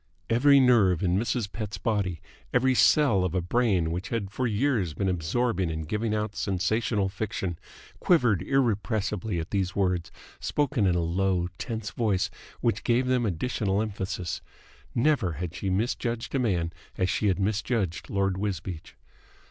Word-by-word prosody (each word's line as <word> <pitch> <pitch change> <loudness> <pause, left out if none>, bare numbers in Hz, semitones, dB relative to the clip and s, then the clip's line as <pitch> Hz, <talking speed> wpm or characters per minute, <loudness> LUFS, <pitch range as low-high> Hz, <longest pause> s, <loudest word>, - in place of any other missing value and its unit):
Every 140 +4 +6
nerve 110 -10 +4
in 90 -1 +2
Mrs. 110 0 -1
Pett's 105 -2 -5
body, 100 -8 -1 0.3
every 130 +1 +3
cell 125 -7 +4
of 90 0 -1
a - - +3
brain 90 -4 +1
which 90 +3 -4
had 105 -5 -2
for 125 +4 -1
years 110 - 0
been 95 - -1
absorbing 95 +3 0
and 80 -1 -4
giving 110 +4 -1
out 105 -1 -2
sensational 100 +2 0
fiction, 95 -3 -3 0.4
quivered 120 - +3
irrepressibly 110 -6 0
at 80 - -5
these 95 -2 -1
words, 90 -4 0 0.3
spoken 140 -8 +1
in 90 - +2
a 85 - +1
low, 90 +1 0
tense 110 -2 -4
voice 100 -5 0 0.3
which 115 - 0
gave 120 +1 +2
them 125 -2 +1
additional 100 +1 -1
emphasis. 95 -4 -3 0.5
Never 120 - +2
had 85 +2 -5
she 95 +2 -3
misjudged 115 +3 -1
a 135 - +1
man 90 -9 0 0.2
as 90 - +1
she 105 - 0
had 95 - +2
misjudged 100 -2 -1
Lord 95 -1 0
Wisbeach. 90 -4 -4
100 Hz, 155 wpm, -27 LUFS, 90-115 Hz, 0.5 s, Every